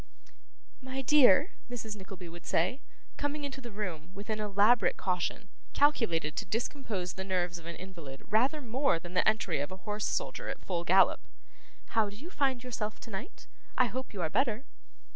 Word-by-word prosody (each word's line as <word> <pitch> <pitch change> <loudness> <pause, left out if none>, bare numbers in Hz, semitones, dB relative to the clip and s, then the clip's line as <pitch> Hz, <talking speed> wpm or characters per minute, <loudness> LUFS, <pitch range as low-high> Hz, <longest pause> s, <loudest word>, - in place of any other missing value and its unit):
'My 265 +1 -4
dear,' 285 - +6 0.2
Mrs. 225 -3 -5
Nickleby 190 -2 -9
would 170 +1 -10
say, 190 - +1 0.4
coming 290 +1 -2
into 270 -1 -5
the 240 - -7
room 185 -5 -5
with 205 +3 -5
an 215 - -1
elaborate 210 +1 +4
caution, 185 +2 -1 0.2
calculated 175 - +2
to - - -1
discompose 215 -5 -2
the 190 - -5
nerves 180 -2 -1
of 165 - -12
an 170 - -5
invalid 165 -8 -9
rather 260 +8 +2
more 260 - +2
than 175 +2 -9
the 180 - +3
entry 195 -8 0
of 145 +3 -2
a 185 +1 -10
horse 210 0 -1
soldier - - -2
at - - -6
full 175 -3 -1
gallop; 185 +3 +4 0.6
'how 220 -3 +2
do 200 - -10
you 310 - -10
find 265 -5 +1
yourself 215 -4 -3
tonight? 225 - -7 0.3
I 255 - +6
hope 255 +3 -4
you 190 -4 -3
are 160 - 0
better. 245 0 +1
210 Hz, 180 wpm, -31 LUFS, 180-255 Hz, 0.6 s, dear